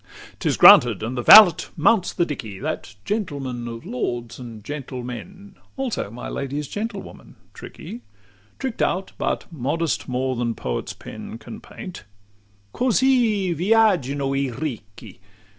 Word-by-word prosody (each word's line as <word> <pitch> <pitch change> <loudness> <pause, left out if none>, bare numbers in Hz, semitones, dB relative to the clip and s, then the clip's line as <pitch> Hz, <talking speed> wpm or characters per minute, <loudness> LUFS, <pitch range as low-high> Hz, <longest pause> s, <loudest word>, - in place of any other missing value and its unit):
XLVII - - -18
'T - - 0
is - - 0
granted; 115 -4 +7
and 120 +3 -3
the 120 - -2
valet 200 - +9
mounts 185 +4 +3
the 175 - 0
dickey 115 - -6
That 95 - -5
gentleman 140 - -3
of 115 0 -8
lords 120 -2 -4
and 115 -4 -10
gentlemen; 140 - -7 0.2
Also 260 - -3
my 120 +3 -8
lady's 140 +1 -4
gentlewoman, 210 - -7 0.2
tricky, 120 - -10 0.6
Trick'd 260 -4 -4
out, 190 +2 0
but - - -1
modest 155 +2 -2
more 130 +1 -1
than 120 -1 -2
poet's - - -4
pen - - -9
Can 115 0 -10
paint, 185 - -10 0.7
"Cosi 235 -6 +2
viaggino 170 - +2
i 135 -1 0
Ricchi!" 110 -6 -7
140 Hz, 135 wpm, -22 LUFS, 120-195 Hz, 0.7 s, valet